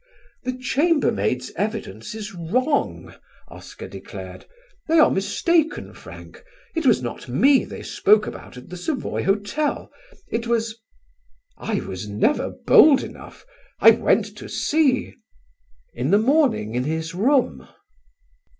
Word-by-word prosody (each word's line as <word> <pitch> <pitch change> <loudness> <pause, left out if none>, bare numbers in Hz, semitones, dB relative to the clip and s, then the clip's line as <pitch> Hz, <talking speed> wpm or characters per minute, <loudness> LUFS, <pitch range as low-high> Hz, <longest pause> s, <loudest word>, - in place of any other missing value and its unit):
"The 255 0 -3
chambermaids' 255 - 0
evidence 205 - -4
is 215 -1 -7
wrong," 250 - -1 0.4
Oscar - - -10
declared. - - -10 0.4
"They 330 +1 +3
are 310 - +6
mistaken, 310 - 0
Frank. - - -13 0.3
It 325 -4 0
was 225 - +3
not 120 - -6
me 265 - +4
they - - -9
spoke 210 +1 +3
about - - -9
at 125 - -12
the 180 - -7
Savoy 260 - -3
Hotel. 205 +10 -1 0.4
It 230 +1 -3
was. 230 -1 -1 0.8
I 215 -3 -3
was 95 +3 -7
never 105 - +1
bold 295 -3 +5
enough. - - -11 0.3
I - - +9
went - - +2
to - - -9
see 290 -4 +1 0.8
in 125 +4 -2
the 200 - +5
morning 245 - +2
in 125 +1 -1
his 160 +2 -3
room." 250 +9 +1
220 Hz, 125 wpm, -22 LUFS, -, 0.8 s, I